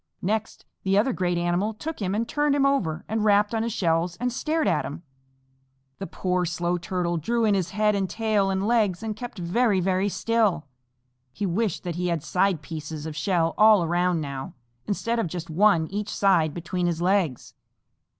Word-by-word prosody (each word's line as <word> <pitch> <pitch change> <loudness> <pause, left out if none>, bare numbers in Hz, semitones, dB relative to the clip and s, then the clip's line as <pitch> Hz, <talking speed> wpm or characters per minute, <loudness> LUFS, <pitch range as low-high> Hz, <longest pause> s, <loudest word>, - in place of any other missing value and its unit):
Next 215 +3 -2 0.2
the 195 +1 +1
other 240 +5 +2
great 175 -3 0
animal 175 +5 0
took 310 +4 -6
him 195 0 -1
and 230 +2 -1
turned 295 +1 +1
him 280 -1 +3
over 180 - 0
and 220 0 -1
rapped 205 0 +3
on 225 - 0
his 230 +1 -1
shells 170 -3 0
and 245 +4 -2
stared 315 +4 0
at - - +1
him. 155 +5 -7 1.0
The 195 - -5
poor 180 -1 -1
Slow 175 0 -1
Little 180 - 0
Turtle 175 -1 -1
drew 230 +8 0
in 210 - +3
his 185 -3 0
head 210 +2 +1
and 195 -2 -1
tail 210 -1 +1
and 190 +1 -1
legs 215 -4 +1
and 220 -1 -3
kept 240 0 -8
very, 195 +4 +1
very 190 +2 +1
still. 210 -7 +1 0.7
He 200 - -3
wished 195 +1 -1
that 175 -2 -4
he 180 0 -1
had 170 -4 -1
side 180 -2 +1
pieces 155 -1 -6
of 160 -1 -6
shell 165 0 +1
all 215 -3 +7
around 175 0 +1
now, 140 -2 -6 0.3
instead 230 +3 -1
of 225 - 0
just 165 0 -6
one 180 0 +4
on 160 - -8
each 205 +1 -3
side 175 -6 +2
between 175 +1 -2
his 170 -2 -1
legs. 180 -7 0
190 Hz, 200 wpm, -25 LUFS, 170-215 Hz, 1.0 s, all